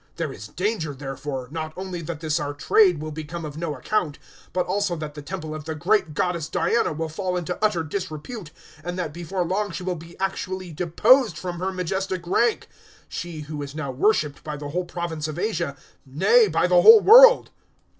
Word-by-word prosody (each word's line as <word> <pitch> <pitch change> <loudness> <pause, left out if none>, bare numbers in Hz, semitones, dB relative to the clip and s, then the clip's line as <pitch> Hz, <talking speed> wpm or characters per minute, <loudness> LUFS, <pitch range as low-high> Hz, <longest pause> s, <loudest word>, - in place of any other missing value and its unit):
019:027 - - -40
There 160 -5 -3
is 105 -2 -9
danger, 180 - -2
therefore, 135 -1 -5
not 155 0 -5
only 185 -2 -5
that 160 -1 -6
this 155 0 0
our 145 -1 -4
trade 180 +2 +4
will 155 +1 -5
become 155 +2 -6
of 150 -1 -7
no 160 -2 -3
account, 150 +1 -1 0.3
but 180 -1 0
also 200 -1 -1
that 155 -2 -6
the 150 - -8
temple 155 0 -6
of 155 -1 -7
the 160 0 -4
great 175 -1 +1
goddess 170 -1 -1
Diana 235 - +1
will 160 +1 -3
fall 180 +3 -3
into 180 +3 -4
utter 195 -6 +2
disrepute, 175 +3 -6 0.3
and 175 +2 -4
that 170 -5 -3
before 175 +2 -3
long 205 +4 -1
she 185 +1 -6
will 185 0 -1
be 165 +1 -12
actually 185 -1 -3
deposed 210 - +3
from 175 -2 -5
her 190 +1 -1
majestic 185 0 -3
rank 230 +6 +1 0.4
she 170 -3 -6
who 150 0 -6
is 140 0 -7
now 145 -4 -4
worshipped 150 0 +1
by 150 -1 -5
the 145 0 -6
whole 180 +4 -2
province 170 -3 -4
of 155 0 -6
Asia; 170 -8 -2 0.3
nay, 190 - +4
by - - +1
the - - +5
whole 445 -1 +10
world." - - +8
170 Hz, 200 wpm, -24 LUFS, 155-190 Hz, 0.4 s, whole